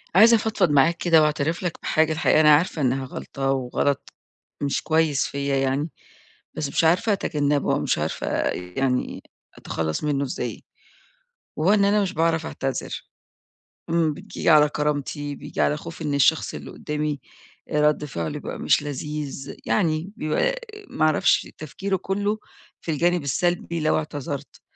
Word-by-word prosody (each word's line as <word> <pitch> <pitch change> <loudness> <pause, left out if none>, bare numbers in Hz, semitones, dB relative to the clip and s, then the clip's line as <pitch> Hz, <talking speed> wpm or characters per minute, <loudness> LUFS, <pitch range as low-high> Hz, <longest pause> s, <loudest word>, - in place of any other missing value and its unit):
عايزة 225 +4 +8
أفضفض 220 -5 +1
معاك 155 +4 +4
كده 165 -2 +4
وأعترف 155 +3 0
لك 175 - -3
بحاجة 160 0 +2
الحقيقة، 160 -1 +3
أنا 150 -1 +7
عارفة 160 0 0
إنها 130 0 +1
غلطة 135 +1 -3
وغلط 135 +1 -1 0.5
مش 140 -1 0
كويس 160 -3 +2
فيَّ 140 0 -3
يعني، 135 +4 0 0.7
بس 150 -3 -2
مش 140 - +1
عارفة 180 +7 +3
أتجنبه 145 -6 0
أو - - +1
مش - - 0
عارفة - - -3 0.2
يعني 125 +9 -2 0.3
أتخلص 80 - -3
منه 145 -2 0
إزاي. 130 - -5 0.9
وهو 170 +6 +3
إن 200 -1 +4
أنا 205 +1 +3
مش 190 -2 -2
باعرف 160 0 +1
أعتذر. 135 -2 -4 0.9
اما 165 -2 +2
بييجي - - -3
على 150 -2 +7
كرامتي، 145 0 -2
بييجي - - -4
على 150 - +2
خوفي 165 +1 -8
إن 145 - -1
الشخص 140 +3 +3
اللي - - -8
قدّامي 150 -1 -3 0.5
رد 150 0 +2
فعله 85 - -4
يبقى - - -6
مش - - +3
لذيذ. 145 -1 -5
يعني 155 - 0
بيبقى - - 0 0.3
ما 155 - +1
أعرفش 155 -1 +3
تفكيره 190 +6 -3
كله 205 +4 -1 0.4
في 165 - -3
الجانب 170 +2 +1
السلبي 170 +4 0
لو 155 - +2
اعتذرت. 145 -3 -5
150 Hz, 150 wpm, -24 LUFS, 140-170 Hz, 0.9 s, عايزة